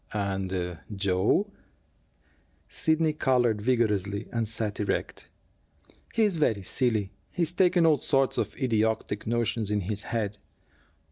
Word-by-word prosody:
"And 95 -4 -2 0.2
Joe?" 100 - +1 1.2
Sidney 160 0 +1
colored 125 -7 +2
vigorously 105 -4 0
and 115 -2 -1
sat 110 -2 -3
erect. 105 - -3 0.9
"He 230 - +4
is 200 -5 +2
very 110 -10 +1
silly. 110 -2 +1 0.2
He's 170 -2 -1
taken 180 -2 +3
all 155 -2 +5
sorts 135 -2 +2
of - - -3
idiotic 110 -4 0
notions 115 -2 0
in 105 -1 0
his 100 +2 -3
head." 105 -3 -2
110 Hz, 120 wpm, -27 LUFS, 100-135 Hz, 1.2 s, all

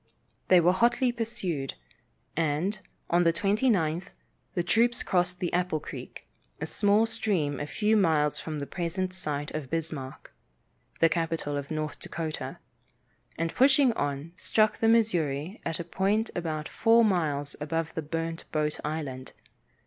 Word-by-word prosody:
They 185 - +7
were 175 +1 +5
hotly 240 +5 +3
pursued, 220 - -3 0.6
and, 165 +6 0 0.3
on 175 +1 +4
the 165 - +5
29th, 185 -3 +1 0.5
the 175 - +1
troops 235 +6 +2
crossed 180 0 0
Apple 180 -3 +1
creek, - - -9 0.3
a - - -2
small 205 +2 +3
stream 195 - -1
a 145 - -3
few 215 +6 +1
miles 155 -7 +3
from 155 -1 -5
the 145 - -3
present 180 +4 -2
site 145 -5 -3
of 150 -4 -5
Bismarck, 155 -5 -5 0.7
the 165 - +8
capital 165 -2 -1
of 140 -1 -4
North 155 -1 -3
Dakota, 160 -2 -5 0.8
and 165 0 -1
pushing 265 0 +5
on, 145 -3 -3
struck 215 +4 +2
the 225 - +3
Missouri 180 -6 +1
at 165 -1 -3
a - - -2
point 195 +6 0
about 155 -3 -3
four 230 0 +4
miles 150 -8 0
above 160 +1 -2 0.2
Burnt 165 0 -3
Boat 150 -1 -1
Island. 145 -4 -4
165 Hz, 140 wpm, -28 LUFS, 155-205 Hz, 0.8 s, the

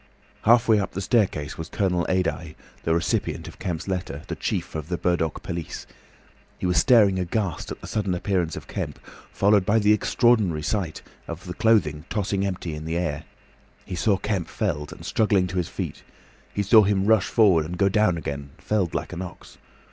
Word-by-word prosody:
Halfway 115 -1 +5
up 100 - -3
the 95 - -3
staircase 95 -9 0
was 80 - -5
Colonel 90 -3 0
Adye, 90 -3 -1 0.3
the 80 - +1
recipient 85 - -1
of - - -11
Kemp's 85 -2 -4
letter, 90 -6 -3
the - - -2
chief - - -3
of 80 0 -5
the 90 - -1
Burdock 85 -3 -1
police. 85 -2 -5 0.7
He - - -4
was 90 -1 +2
staring 100 -2 +5
aghast 90 0 -2
at - - -7
the - - -9
sudden 100 -4 -1
appearance 90 -3 -1
of - - -8
Kemp, - - -4 0.3
followed 100 0 +3
by 105 +4 +2
the 105 -1 +4
extraordinary 105 -7 +2
sight 90 -1 -2 0.2
of 90 +2 -7
clothing 100 -10 +2
tossing 100 -1 -1
empty 90 -4 -4
in 75 +1 -6
the 80 +1 -2
air. 80 -4 -2 0.6
He - - -7
saw 100 +3 +2
Kemp 100 -3 -2
felled, 75 0 -2
and - - -11
struggling 105 -4 +2
to 90 +1 -4
his 90 - -1
feet. - - -5 0.5
He 100 - -1
saw 110 +3 +7
him 100 -1 +2
rush 110 -2 +4
forward, 95 -9 +4
and 90 +3 -5
go 100 - +3
down 100 -3 +2
again, 70 -3 -5
felled 100 -6 -1
like - - -3
an 90 - -5
ox. 90 -2 -10
90 Hz, 185 wpm, -24 LUFS, 85-105 Hz, 0.7 s, saw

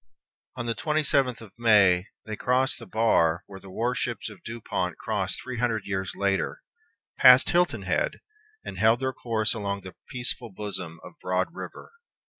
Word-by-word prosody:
On 120 -2 -4
the 115 - 0
twenty 155 +4 0
seventh 130 -4 +2
of 110 -4 -12
May 100 -5 +5 0.2
they 110 -1 -4
crossed 125 +3 +1
the 115 - -10
bar 85 -7 +2
where 95 -1 -10
the 95 - -13
war 120 +6 -1
ships - - -3
of - - -14
Dupont 95 -6 -3
crossed 100 -4 -2
three 130 -2 -6
hundred 115 -3 0
years 95 -1 -2
later, 100 -1 -1 0.6
passed 125 0 +8
Hilton 175 0 +2
Head, - - 0 0.5
and - - -6
held 110 +2 +4
their 130 0 -1
course 110 -3 0
along 100 -2 -3
the 95 0 -10 0.2
peaceful 125 -1 -3
bosom 95 -5 -6
of - - -13
Broad 90 - -1
River. - - -9
110 Hz, 170 wpm, -27 LUFS, 95-125 Hz, 0.6 s, passed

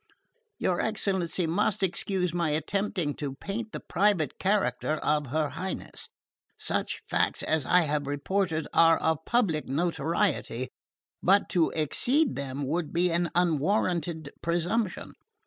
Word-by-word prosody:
Your 180 -2 0
excellency 190 -5 0
must 195 +5 +1
excuse 185 -1 0
my 170 -2 0
attempting 170 0 -1
to 140 -3 -4
paint 215 +8 -5
the - - -5
private 195 -5 +1
character 195 -5 +1
of 150 -2 0
her 150 +3 0
Highness. 190 0 -5 0.5
Such - - -2
facts - - +1
as 155 -4 0
I 180 - +5
have 150 -3 -1
reported 160 +3 -1
are 165 -1 +6
of 160 -1 0
public 200 -11 +1
notoriety, 160 - 0 0.5
but 195 +2 +4
to 170 -3 +3
exceed 250 - +2
them 140 0 -4
would 160 +3 -1
be 175 +1 +2
an 170 0 +1
unwarranted 170 -2 +1
presumption. 175 +5 -1
170 Hz, 130 wpm, -28 LUFS, 155-190 Hz, 0.5 s, are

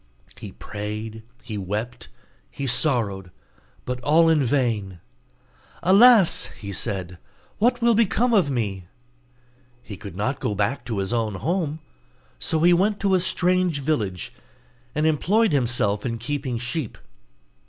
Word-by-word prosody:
He - - -9
prayed, 105 +1 -6 0.2
he 110 -4 -5
wept, 105 - -5 0.4
he 140 - -6
sorrowed, 120 -8 +1 0.6
but 125 0 -3
all 160 +5 +4
in 155 -3 +3
vain. 115 -8 -1 0.8
'Alas!' 205 0 +6
he 100 -1 -7
said, 90 -2 -4 0.4
'what 240 +2 +2
will 235 0 +5
become 230 +2 +2
of 190 -9 +3
me?' 100 -8 -3 1.0
He 100 -4 -9
could 100 -3 -9
not 115 +8 -2
go 105 - -2
back 105 +7 -1
to 115 -3 -3
his 95 +3 -2
own 110 -4 -1
home, 160 - -2 0.6
so 160 - -1
he 175 +1 +6
went 200 +4 +1
to 195 -1 +2
a 185 - +4
strange 180 -3 +1
village, 105 - -2 0.6
and 150 +1 +1
employed 195 +8 +2
himself 120 -7 +1
in 115 -2 -3
keeping 130 +1 -3
sheep. 125 +2 -4
125 Hz, 135 wpm, -23 LUFS, 105-170 Hz, 1.0 s, Alas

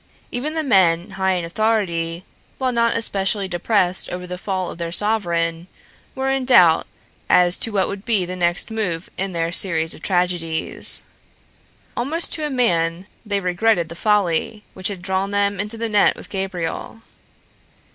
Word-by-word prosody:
Even 295 +6 -3
the 320 - -1
men 185 - +3
high 190 0 0
in 175 -2 -2
authority, 175 -4 -1 0.3
while 260 -1 0
not 235 -1 +1
especially 200 -2 0
depressed 185 0 +1
over 180 0 -5
the 180 0 -6
fall 185 -2 -3
of - - -11
their 170 -1 -4
sovereign, 170 -4 +1 0.5
were 265 0 -1
in 270 -1 0
doubt 180 -11 +5 0.4
as 180 0 +4
to 225 - +3
what 195 -3 +1
would 200 0 -6
be 215 -6 +1
the 180 +1 -5
next 175 +4 -1
move 185 -7 -3
in 190 0 -3
their 165 0 -1
series 165 -3 +2
of - - -11
tragedies. 175 -3 +2 0.9
Almost 310 +8 0
to 310 -2 -1
a - - -6
man 175 -9 0 0.2
they 205 -3 -1
regretted 180 -1 +1
the 170 - -8
folly 210 +2 0
which 185 -1 -4
had 190 -3 -6
drawn 190 +1 -1
them 200 -1 0
into 210 +3 -3
the 230 +1 -2
net 210 -2 +3
with - - -11
Gabriel. 190 +2 -4
190 Hz, 165 wpm, -20 LUFS, 175-220 Hz, 0.9 s, doubt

